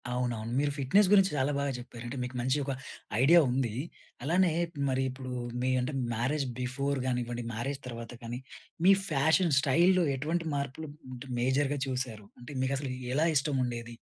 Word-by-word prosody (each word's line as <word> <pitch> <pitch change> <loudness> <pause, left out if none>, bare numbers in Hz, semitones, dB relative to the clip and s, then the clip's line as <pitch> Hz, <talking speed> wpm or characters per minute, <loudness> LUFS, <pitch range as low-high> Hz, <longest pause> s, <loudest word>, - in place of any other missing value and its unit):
అవునవును. 120 -2 -2
మీరు 145 0 +1
ఫిట్నెస్ 185 +10 +4
గురించి 195 -1 +6
చాలా 135 +2 +2
బాగా 140 0 0
జెప్పారు. 120 -1 -9
అంటే 130 +3 -5
మీకు 125 +1 -6
మంచి 130 +3 +1
ఒక 135 - -1 0.5
ఐడియా 165 +6 +7
ఉంది. 125 -3 0 0.5
అలానే 175 +3 +3 0.4
మరి 130 0 +1
ఇప్పుడు 130 0 -7 0.3
మీ 130 - +1
అంటే 125 +4 -2 0.2
మ్యారేజ్ 135 +5 0 0.2
బిఫోర్ 140 +2 -1
గానివ్వండి, 120 -1 -2
మ్యారేజ్ 135 +5 -3
తర్వాత 115 -1 -7
కానీ 120 +1 -4 0.5
మీ 195 - +9 0.2
ఫ్యాషన్ 160 +3 +3
స్టైల్‌లో 170 +6 +4
ఎటువంటి 160 +5 -2
మార్పులు 140 +2 -4 0.2
అంటే 125 +2 -8
మేజర్‌గా 135 +3 +1
చూసారు? 125 -5 -3 0.2
అంటే 120 - -9
మీకసలు 135 0 -1 0.2
ఎలా 155 +3 +3
ఇష్టం 135 0 0
ఉండేది? 120 -1 -5
135 Hz, 160 wpm, -30 LUFS, 125-145 Hz, 0.5 s, మీ